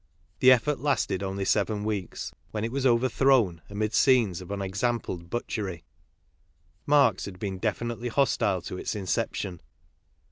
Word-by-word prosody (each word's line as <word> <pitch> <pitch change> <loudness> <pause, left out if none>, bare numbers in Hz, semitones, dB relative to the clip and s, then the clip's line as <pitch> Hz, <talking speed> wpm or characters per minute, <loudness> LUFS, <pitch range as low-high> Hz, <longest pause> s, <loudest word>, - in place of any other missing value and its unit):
The 130 - +7
effort 135 +4 +3
lasted 135 -9 0
only 95 0 -3
seven 105 +1 +1
weeks, 100 -5 -4 0.2
when 105 -1 -4
it 115 - -2
was 135 0 +1
overthrown 120 -6 +3
amid 105 +2 -2
scenes 115 -10 +3
of 90 - -11
unexampled 100 -2 -2
butchery. 100 -7 -4 1.0
Marx 140 -9 +4
had 95 -2 -8
been 95 -1 -4
definitely 115 +2 -2
hostile 115 -7 +1
to 90 - -6
its - - -3
incep 95 -3 -1
tion. 90 -4 -5
105 Hz, 140 wpm, -27 LUFS, 95-120 Hz, 1.0 s, The